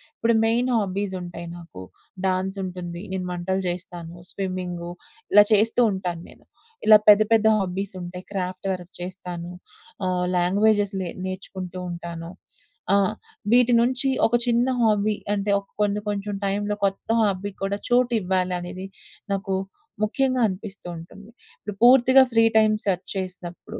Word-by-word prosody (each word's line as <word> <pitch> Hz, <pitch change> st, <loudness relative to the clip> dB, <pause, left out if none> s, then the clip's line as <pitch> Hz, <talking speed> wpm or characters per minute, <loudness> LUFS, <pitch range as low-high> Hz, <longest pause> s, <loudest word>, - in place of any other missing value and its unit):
ఇప్పుడు 235 Hz, -, +1 dB
మెయిన్ 240 Hz, +3 st, +1 dB
హాబీసుంటాయి 185 Hz, -4 st, -3 dB
నాకు. 165 Hz, -, -11 dB, 0.4 s
డాన్సుంటుంది, 185 Hz, -2 st, -2 dB
నేను 185 Hz, -1 st, -3 dB
వంటలు 190 Hz, +2 st, -2 dB
జేస్తాను, 175 Hz, -1 st, -6 dB, 0.2 s
స్విమ్మింగ్గు, 180 Hz, -3 st, -4 dB, 0.4 s
ఇలా 205 Hz, -, +9 dB
చేస్తూ 220 Hz, +3 st, +3 dB
ఉంటాను 180 Hz, -3 st, -3 dB
నేను. -, -, -18 dB, 0.4 s
ఇలా 215 Hz, -1 st, +10 dB
పెద్ద 210 Hz, +1 st, +8 dB
పెద్ద 220 Hz, -1 st, +4 dB
హాబ్బీసుంటాయి. 185 Hz, -1 st, -4 dB
క్రాఫ్ట్ 185 Hz, -1 st, -4 dB
వర్క్ 180 Hz, -1 st, -6 dB
చేస్తాను. 180 Hz, -1 st, -6 dB, 0.6 s
ఆహ్, 180 Hz, -1 st, 0 dB
లాంగ్వేజెస్ 205 Hz, +3 st, +2 dB
లే 180 Hz, -, -3 dB, 0.2 s
నేర్చుకుంటూ 185 Hz, -1 st, -6 dB
ఉంటాను. 170 Hz, -1 st, -7 dB, 0.6 s
ఆ! -, -, +5 dB, 0.5 s
వీటి 245 Hz, 0 st, +5 dB
నుంచి 255 Hz, +3 st, +1 dB, 0.2 s
ఒక 240 Hz, -, +1 dB
చిన్న 240 Hz, +1 st, +3 dB
హాబీ 215 Hz, -1 st, +2 dB, 0.2 s
అంటే 200 Hz, 0 st, -1 dB
ఒక 200 Hz, -, -16 dB
కొన్ని 205 Hz, 0 st, +1 dB
కొంచెం 205 Hz, 0 st, -3 dB
టైంలో 205 Hz, +1 st, -1 dB
కొత్త 195 Hz, 0 st, -2 dB
హాబీ 200 Hz, -1 st, 0 dB
కూడా 200 Hz, +1 st, -1 dB
చోటివ్వాలనేది 185 Hz, -6 st, 0 dB, 0.5 s
నాకు 195 Hz, -1 st, -2 dB, 0.5 s
ముఖ్యంగా 255 Hz, +3 st, +1 dB
అనిపిస్తూంటుంది. 190 Hz, -1 st, -8 dB, 0.3 s
ఇప్పుడు 210 Hz, -1 st, -7 dB
పూర్తిగా 260 Hz, +1 st, +7 dB
ఫ్రీ 225 Hz, -, +5 dB
టైం 215 Hz, -1 st, +5 dB
సెర్చ్ 185 Hz, -3 st, -1 dB
చేసినప్పుడు 180 Hz, -2 st, -6 dB
190 Hz, 125 wpm, -24 LUFS, 180-210 Hz, 0.6 s, ఇలా